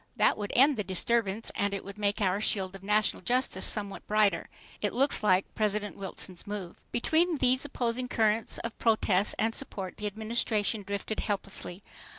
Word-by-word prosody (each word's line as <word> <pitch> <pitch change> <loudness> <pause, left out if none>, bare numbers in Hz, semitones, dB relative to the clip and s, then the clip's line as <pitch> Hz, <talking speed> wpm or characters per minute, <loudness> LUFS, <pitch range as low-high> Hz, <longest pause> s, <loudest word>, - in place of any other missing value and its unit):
That - - +4
would 205 -1 -5
end 275 +1 +5
the 210 - -1
disturbance 205 +3 -1
and 200 0 0
it 200 - -6
would 200 +1 -9
make 205 +1 0
our 195 +1 +1
shield 190 -3 +1
of 195 - -10
national 210 +2 +1
justice 255 +2 +1
somewhat 200 -2 -2
brighter. 210 -1 +2 0.3
It - - 0
looks 275 +3 +2
like 190 -3 +2
President 210 -1 -1
Wilson's 190 -2 -5
move. 200 -4 -6
Between 325 +7 +2
these 255 +1 +2
opposing 250 -2 -1
currents 220 -2 +1
of 230 -1 -5
protest 210 -3 +2
and 225 +1 +1
support, 195 -9 -5
the 210 - -2
Administration 215 0 0
drifted 200 +2 -4
helplessly. 195 -2 -2
210 Hz, 165 wpm, -29 LUFS, 200-230 Hz, 0.3 s, end